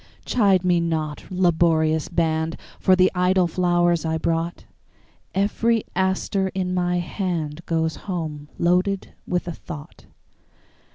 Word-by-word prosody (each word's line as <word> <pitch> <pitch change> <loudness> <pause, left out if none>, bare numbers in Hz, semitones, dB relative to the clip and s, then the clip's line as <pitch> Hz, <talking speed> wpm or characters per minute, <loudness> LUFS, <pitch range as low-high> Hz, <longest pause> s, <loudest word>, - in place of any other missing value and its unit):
Chide 200 -6 +3
me 175 -1 +4
not, 160 -3 -2
laborious 160 -3 +2
band, 160 -1 0 0.2
For 185 - +5
the 185 0 +4
idle 180 0 +3
flowers 175 -1 +2
I 160 0 0
brought; 165 +1 -2 0.7
Every 220 +3 +1
aster 190 +1 0
in 185 -1 -1
my 180 -1 +1
handGoes 165 -3 -2
home 155 -6 -5
loaded 180 +3 +1
with 180 0 -1
a - - -2
thought. 155 -2 -10
175 Hz, 115 wpm, -23 LUFS, 160-185 Hz, 0.7 s, For